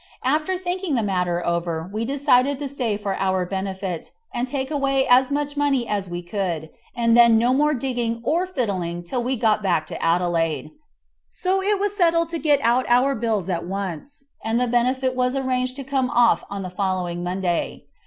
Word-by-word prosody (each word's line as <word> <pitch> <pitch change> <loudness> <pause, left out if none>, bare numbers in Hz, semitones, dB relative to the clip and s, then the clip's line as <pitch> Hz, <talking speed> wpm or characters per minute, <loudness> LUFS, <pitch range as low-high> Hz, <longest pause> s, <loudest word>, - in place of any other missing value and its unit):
After 305 +7 +1
thinking 360 -3 -2
the 230 - +1
matter 180 -3 -1
over, 170 -1 -1
we 220 +2 -2
decided 275 0 +2
to 285 0 -4
stay 250 -6 -2
for 200 -2 -3
our 190 -1 +1
benefit, 190 -2 -4 0.2
and 245 +1 -1
take 265 +1 -3
away 275 -2 +1
as 255 +1 +5
much 290 0 -2
money 280 -4 +1
as 200 -3 -2
we 175 0 -5
could, 175 -4 -3 0.2
and 230 -1 +3
then 235 -1 +7
no 240 +3 +3
more 300 +2 +2
digging 240 -3 -2
or 345 +7 +1
fiddling 185 - -2
till 240 +8 -2
we 255 +2 -1
got 220 -3 +2
back 175 -6 +1
to - - -7
Adelaide. 165 -2 0 0.6
So 380 +1 -1
it 405 +1 +1
was 410 0 -1
settled 335 -3 +2
to 335 -1 -3
get 295 -3 +3
out 245 +2 +2
our 250 +3 +4
bills 220 -6 -1
at 175 -2 -2
once, 195 - -5 0.2
and 225 +2 0
the 250 - +2
benefit 255 +2 +1
was 250 +1 +1
arranged 255 -1 -1
to 275 - -6
come 265 -1 0
off 240 -1 +3
on 200 -1 -5
the 185 - -6
following 180 -2 -2
Monday. 180 -1 -2
240 Hz, 190 wpm, -23 LUFS, 190-275 Hz, 0.6 s, then